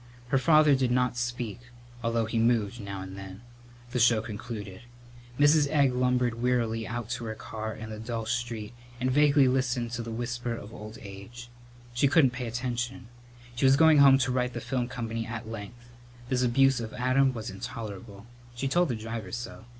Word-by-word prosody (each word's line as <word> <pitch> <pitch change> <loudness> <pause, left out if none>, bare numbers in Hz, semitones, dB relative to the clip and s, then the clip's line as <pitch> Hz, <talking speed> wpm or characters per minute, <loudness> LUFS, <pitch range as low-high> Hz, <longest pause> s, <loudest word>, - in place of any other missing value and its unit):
Her 135 - +3
father 155 0 +5
did 130 -2 +2
not 125 0 +1
speak, 120 -2 -3 0.4
although 115 -1 +1
he 110 +1 -1
moved 115 -1 +1
now 100 -1 -6
and 95 0 -8
then. 95 +1 -9 0.5
The 125 - -1
show 115 -1 +5
concluded. 105 -2 -7 0.6
Mrs. 145 +1 +5
Egg 140 -4 +3
lumbered 125 -2 +1
wearily 115 -3 0
out 120 -1 -4
to 120 -1 -3
her 110 -1 -4
car 110 0 -6
in 110 0 -8
the 110 - -6
dull 115 0 -4
street 120 -2 -3 0.3
and 130 +1 0
vaguely 145 0 +5
listened 125 -2 0
to 120 -1 -3
the 115 - -6
whisper 120 +1 -3
of 110 -1 -10
old 105 0 -9
age. 100 +4 -10 0.4
She 120 +4 +3
couldn't 135 -2 +5
pay 125 -1 -5
attention. 120 +1 -3 0.5
She 130 - +1
was 135 +1 +6
going 160 -1 +6
home 135 -1 +8
to 130 - -1
write 125 0 0
the 120 - -4
film 125 0 -2
company 115 -2 -4
at 115 -1 -6
length. 115 +2 -9 0.4
This 125 -1 +1
abuse 130 +1 +4
of 110 -2 -6
Adam 130 +2 +3
was 115 -1 -6
intolerable. 105 -1 -7 0.3
She 135 +3 -2
told 175 +4 +2
the 120 - 0
driver 110 -3 -6
so. 120 -1 -6
120 Hz, 185 wpm, -28 LUFS, 110-125 Hz, 0.6 s, home